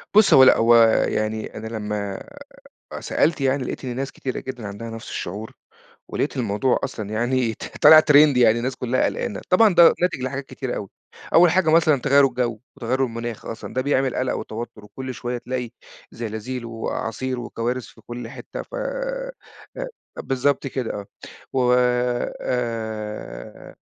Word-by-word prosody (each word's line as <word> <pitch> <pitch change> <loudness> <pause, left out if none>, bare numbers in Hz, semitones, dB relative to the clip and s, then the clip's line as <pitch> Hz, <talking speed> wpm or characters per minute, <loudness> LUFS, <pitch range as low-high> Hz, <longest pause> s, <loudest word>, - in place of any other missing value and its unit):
بُص، 215 -1 +7
هو 130 - +9
لأ. 130 - +7
هو 115 +1 +5 0.3
يعني 110 0 -2
أنا 110 +1 -6
لمّا 105 -3 -4 0.7
أ - - -5
سألت 160 -3 +1
يعني، 135 0 +1
لقيت 130 - -5
إن 125 - -4
ناس 135 +1 -3
كتيرة 130 - -4
جدًا 125 -5 -7
عندها 105 +3 -7
نفس 115 0 -8
الشعور، 105 +5 -5 0.6
ولقيت - - -2
الموضوع 120 +2 +1
أصلًا 105 -3 -4
يعني 120 +1 0
ط - - -9
طالع 155 0 +10
trend 150 -3 +6
يعني 115 -2 +5
الناس 125 +2 -2
كُلّها 125 +1 0
قلقانة. 235 - -3
طبعًا 200 +2 +5
ده 170 -1 +8
ناتج 180 -7 0
لحاجات 130 +2 -3
كتيرة 130 -2 -5
أوي، 100 - -5 0.5
أول 170 0 +7
حاجة 185 -2 +2
مثلًا 155 -4 +4
تغيُّر 140 +1 +5
الجَو 120 -4 -1 0.2
وتغيُّر 130 +3 -1
المناخ 115 -2 -4
أصلًا 115 - -7
ده 130 - 0
بيعمل 135 -1 +1
قلَق 130 0 0
وتوتُّر 110 -1 -7
وكل 130 +4 -7
شوية 120 +1 -4
تلاقي 125 0 -4 0.4
زلازيل 115 +2 -5
وأعاصير 115 +2 -4
وكوارث 120 +1 -3
في - - -17
كل 120 -1 -7
حتّة، - - -8
ف - - -10 1.0
أ - - -8
بالضبط 135 +1 0
كده 130 -3 -3
آه. 100 -1 -6 0.5
و 125 -2 +3 0.7
آآ، 110 - -5
125 Hz, 160 wpm, -23 LUFS, 115-135 Hz, 1.0 s, طالع